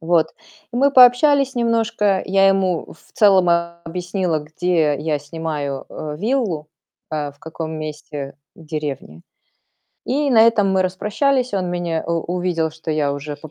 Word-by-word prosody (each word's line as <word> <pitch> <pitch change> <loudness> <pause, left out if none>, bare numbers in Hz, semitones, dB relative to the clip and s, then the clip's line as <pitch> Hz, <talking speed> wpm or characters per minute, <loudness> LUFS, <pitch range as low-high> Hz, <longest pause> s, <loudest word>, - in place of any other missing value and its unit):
Вот. 165 -1 +2 0.4
И - - -4
мы 280 +3 +4
пообщались 270 +2 +6
немножко. 225 -4 +1
Я 195 0 +4
ему 190 -3 0
в 160 - -22
целом 195 -7 +4 0.4
объяснила, 175 -1 -2
где 155 0 0
я 155 -1 -1
снимаю, 145 -2 -5
э, 150 -1 -6
виллу, 205 - -1 0.4
э, 150 -2 -3
в 145 - -29
каком 160 0 -6
месте 150 -2 -6 0.2
в 165 - -15
деревне. 145 - -5 0.8
И 280 +2 0
на 225 -3 +6
этом 225 -4 +4
мы 190 0 +2
распрощались. 225 +8 0
Он 185 -2 -1
меня 175 -2 -2
у 170 0 0 0.2
увидел, 170 -3 -1
что 160 +1 -7
я 150 -2 0
уже 145 +1 -6
по 155 - -12
175 Hz, 150 wpm, -20 LUFS, 155-210 Hz, 0.8 s, пообщались